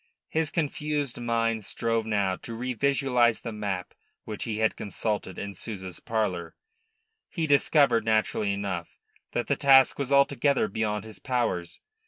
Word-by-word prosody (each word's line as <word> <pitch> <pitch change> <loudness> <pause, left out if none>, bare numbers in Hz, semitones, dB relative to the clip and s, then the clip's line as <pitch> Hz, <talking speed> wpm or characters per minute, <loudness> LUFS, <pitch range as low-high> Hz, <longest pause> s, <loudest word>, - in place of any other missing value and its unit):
His 160 -1 0
confused 150 -5 -2
mind 115 -2 0
strove 115 +1 -1
now 100 -3 +1
to 115 -1 -8
revisualise 125 -1 +2
the 115 - -4
map 100 -4 -4 0.3
which 105 - -5
he 110 -2 -3
had 110 0 +2
consulted 105 -3 -3
in 100 0 -5
Souza's 95 -5 -7
parlour. 105 -7 -2 0.7
He 165 -3 -2
discovered, 140 -5 +4
naturally 110 -2 +1
enough, 100 -4 -4 0.4
that 120 - 0
the 140 - +1
task 135 -1 +5
was 140 -1 -2
altogether 140 -2 +3
beyond 105 0 -2
his 110 -2 -11
powers. 120 -9 -2
115 Hz, 140 wpm, -27 LUFS, 105-135 Hz, 0.7 s, task